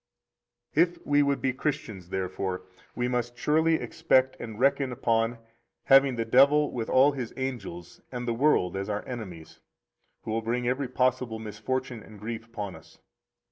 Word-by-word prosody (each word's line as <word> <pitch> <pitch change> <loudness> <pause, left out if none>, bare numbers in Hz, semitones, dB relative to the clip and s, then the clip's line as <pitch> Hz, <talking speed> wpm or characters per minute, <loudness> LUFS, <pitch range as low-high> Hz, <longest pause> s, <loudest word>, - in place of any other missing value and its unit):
65 170 +3 +3
If - - -22
we 145 0 +4
would 140 -1 +1
be 130 - +2
Christians, 125 - -4
therefore, 95 0 -3 0.3
we 120 0 0
must 120 -1 -2
surely 160 +4 +3
expect 130 -5 +2
and 110 -2 -7
reckon 135 0 +2
upon 115 -1 +1 0.5
having 135 -1 +6
the 115 -1 -1
devil 140 +5 +5
with 115 -3 -4
all 135 +3 +5
his 130 -5 -6
angels 100 -10 -5
and 125 -1 -5
the 120 - +1
world 115 -8 +2
as 95 +2 -3
our 105 0 -3
enemies 95 -10 -8 0.6
who - - -4
will 115 +1 0
bring 120 +2 -1
every 130 +2 0
possible 130 -2 0
misfortune 110 +3 -4
and 105 -1 -13
grief 115 +2 -5
upon 105 -4 -6
us. - - -16
120 Hz, 165 wpm, -28 LUFS, 110-135 Hz, 0.6 s, having